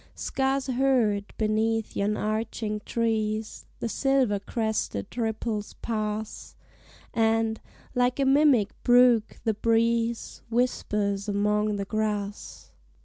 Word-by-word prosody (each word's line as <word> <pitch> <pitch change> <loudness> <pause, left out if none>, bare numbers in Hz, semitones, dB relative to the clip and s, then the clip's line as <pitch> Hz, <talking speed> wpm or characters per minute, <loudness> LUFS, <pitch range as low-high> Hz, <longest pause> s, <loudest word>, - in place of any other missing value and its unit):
Scarce 270 0 -1
heard, 245 -6 +1
beneath 220 +1 0
yon 205 +1 0
arching 215 0 -2
trees, 220 -2 -1
The - - -1
silver 260 -4 +1
crested 220 - -3
ripples 220 -2 -2
pass; 215 -1 -4 0.6
And, 225 0 +1 0.3
like 250 +1 +1
a 275 - +3
mimic 270 -6 +4
brook, 245 -2 +4
the 220 - +1
breeze 230 +1 0
Whispers 210 -4 0
among 210 +1 +1
the 200 -1 -3
grass. 210 -1 -3
220 Hz, 100 wpm, -27 LUFS, 210-235 Hz, 0.6 s, mimic